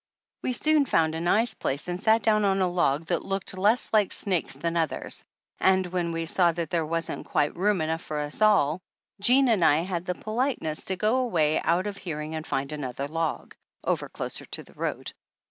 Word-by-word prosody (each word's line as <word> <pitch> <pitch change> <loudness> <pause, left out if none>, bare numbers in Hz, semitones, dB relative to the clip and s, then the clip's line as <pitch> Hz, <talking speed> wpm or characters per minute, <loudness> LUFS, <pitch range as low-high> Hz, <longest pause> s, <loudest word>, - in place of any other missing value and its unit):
We 255 - -1
soon 305 +1 +3
found 160 -1 +2
a 160 - -3
nice 215 +6 +3
place 140 -3 -2
and 175 0 -3
sat 220 0 +3
down 215 -1 +3
on 195 -1 +2
a 185 - +2
log 165 -4 +1
that 170 -1 -1
looked 195 -1 -2
less 210 +6 +2
like 210 -3 +3
snakes 185 -5 +1
than 170 0 -2
the 170 - +1
others, 160 -2 -3 0.4
and 190 0 +3
when 175 -1 -2
we 165 0 -2
saw 170 +1 +3
that 165 -2 -4
there 165 -3 0
wasn't 165 0 -3
quite 150 -4 0
room 195 0 +1
enough 160 +1 -1
for 155 - -5
us 150 +6 -4
all 185 -6 +4 0.4
Jean 255 +6 +4
and 215 -7 +3
I 155 0 +5
had 180 -1 -3
the 180 - -2
politeness 215 - -2
to 190 - -1
go 215 +7 +1
away 165 -12 +1
out 175 +3 +1
of 205 -1 -4
hearing 155 -3 -5
and 155 0 -5
find 135 +2 -2
another 140 -2 -4
log, 165 +1 -3 0.3
over - - -1
closer - - -5
to - - -5
the - - -19
road. - - -4
175 Hz, 210 wpm, -26 LUFS, 160-205 Hz, 0.4 s, I